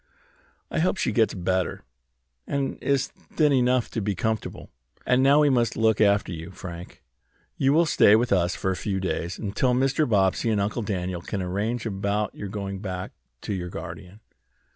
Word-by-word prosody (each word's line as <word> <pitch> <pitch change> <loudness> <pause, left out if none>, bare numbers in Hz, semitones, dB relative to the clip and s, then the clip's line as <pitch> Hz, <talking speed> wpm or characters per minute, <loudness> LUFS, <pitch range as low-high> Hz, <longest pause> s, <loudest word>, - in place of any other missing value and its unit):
I - - 0
hope 185 +3 +1
she - - 0
gets 110 -3 +2
better, 95 0 -1 0.6
and 140 -1 -2
is 140 -1 +1
thin 150 -3 0
enough 125 -1 +2
to 115 - -2
be 100 -1 -1
comfortable. 110 +4 -3 0.3
And 125 +1 +3
now 140 +3 +5
we 145 -2 +4
must 120 -3 +1
look 110 -1 +3
after 100 -2 +3
you, 85 0 -6
Frank. 90 -2 -9 0.5
You 135 - +2
will 165 +4 +4
stay 105 -8 +5
with 120 +2 +1
us 90 -1 +1
a 95 - +2
few 95 0 -2
days, 90 -2 -3
until 120 +4 0
Mr. 135 +2 +1
Bobbsey 100 +1 +2
and 105 -2 +1
Uncle 105 +4 -1
Daniel 90 -4 -3
can 95 +2 -4
arrange 105 +6 -2
about 100 0 -1
your 100 - -6
going 100 -1 -5
back 95 -2 -5 0.3
to 105 - -3
your 90 -2 -4
guardian." 90 +5 -9
105 Hz, 175 wpm, -25 LUFS, 95-125 Hz, 0.6 s, now